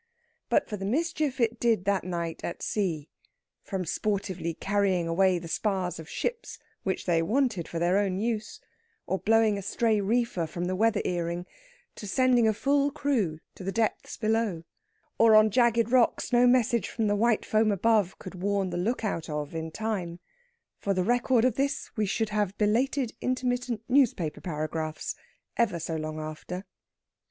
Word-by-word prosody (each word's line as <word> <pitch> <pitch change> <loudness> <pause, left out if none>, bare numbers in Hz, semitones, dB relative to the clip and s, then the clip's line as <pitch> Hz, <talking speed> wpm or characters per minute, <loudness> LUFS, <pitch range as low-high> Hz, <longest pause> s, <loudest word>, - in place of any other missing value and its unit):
But - - +2
for 210 - -4
the 195 - -5
mischief 300 - -1
it 230 -1 +1
did 225 -6 +2
that 200 -1 +1
night 170 -2 -4
at 170 - -5
sea, 170 -8 -2 0.5
from 190 -3 -4
sportively 190 -3 -2
carrying 195 -4 +1
away 185 +2 +3
the 170 -1 -7
spars 185 -1 -1
of 160 - -10
ships, 475 0 -4 0.2
which 190 -1 -2
they 170 -2 +2
wanted 220 - 0
for 170 - -5
their 175 +4 +2
own 195 -2 0
use, 220 +1 -2 0.5
or 190 - -1
blowing 220 -2 +3
a - - -5
stray 215 +2 +1
reefer 215 -5 0
from 175 +3 -4
the 185 +1 -1
weather 220 +1 +2
earring, 175 0 -2 0.5
to 205 - -7
sending 245 +2 +3
a 220 - +3
full 280 +4 +2
crew 250 - -1
to - - -10
the 195 - -2
depths 220 +2 -1
below, 220 -6 0 0.6
or 225 -1 +7
on 215 0 +6
jagged 235 0 +3
rocks 250 0 +2
no 245 +1 +6
message 240 -4 +3
from 225 - -1
the 205 0 +2
white 225 +1 +2
foam 215 0 +2
above 205 -1 +2
could 185 - -9
warn 200 -1 0
the 175 - -3
look 220 +6 -1
out 165 -6 -3
of 150 0 -4
in 160 0 -4
time 185 -3 -3 0.6
for 200 -1 -1
the 185 - +1
record 245 +2 +2
of 255 -3 +1
this 275 +1 -1
we 215 -3 0
should 220 +3 -1
have 210 -2 -1
belated 240 +4 +1
intermittent 245 -3 -1
newspaper 245 - +2
paragraphs, 155 -1 -3 0.4
ever 230 -7 +2
so 165 0 -3
long 155 0 -4
after. 155 +5 -6
205 Hz, 170 wpm, -28 LUFS, 175-235 Hz, 0.6 s, or